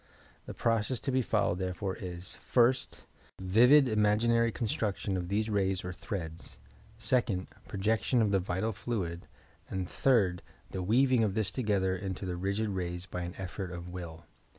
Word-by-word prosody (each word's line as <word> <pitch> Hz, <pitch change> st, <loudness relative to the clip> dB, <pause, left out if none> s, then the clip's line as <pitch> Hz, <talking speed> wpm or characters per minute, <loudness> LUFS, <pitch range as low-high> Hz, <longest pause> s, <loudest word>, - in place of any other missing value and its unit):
The -, -, -6 dB
process 115 Hz, +1 st, +1 dB
to 135 Hz, -, -1 dB
be 130 Hz, 0 st, +2 dB
followed 105 Hz, -6 st, +1 dB
therefore 95 Hz, +1 st, -2 dB
is: 90 Hz, -3 st, -6 dB
first, 125 Hz, +1 st, +1 dB, 0.3 s
vivid 125 Hz, +10 st, +6 dB
imaginary 115 Hz, +2 st, +3 dB
construction 105 Hz, -3 st, -2 dB
of 90 Hz, -1 st, -2 dB
these 105 Hz, +2 st, +1 dB
rays 95 Hz, -4 st, 0 dB
or 90 Hz, -, -4 dB
threads; 85 Hz, -, -6 dB, 0.4 s
second, 115 Hz, -4 st, +1 dB, 0.2 s
projection 110 Hz, +5 st, +1 dB
of 110 Hz, -3 st, +3 dB
the 100 Hz, -, +3 dB
vital 95 Hz, +4 st, -1 dB
fluid; 95 Hz, -6 st, -4 dB, 0.4 s
and 95 Hz, -1 st, -3 dB
third, 100 Hz, -10 st, +2 dB, 0.3 s
the 95 Hz, -, -3 dB
weaving 125 Hz, +5 st, +3 dB
of 100 Hz, -3 st, 0 dB
this 110 Hz, -3 st, 0 dB
together 100 Hz, -6 st, +1 dB
into 95 Hz, 0 st, -4 dB
the 90 Hz, -1 st, -2 dB
rigid 100 Hz, +4 st, -1 dB
rays 90 Hz, -2 st, -3 dB
by 90 Hz, -2 st, -5 dB
an 85 Hz, +1 st, -5 dB
effort 95 Hz, 0 st, -5 dB
of 85 Hz, 0 st, -7 dB
will. 85 Hz, -2 st, -8 dB
100 Hz, 155 wpm, -31 LUFS, 90-115 Hz, 0.4 s, vivid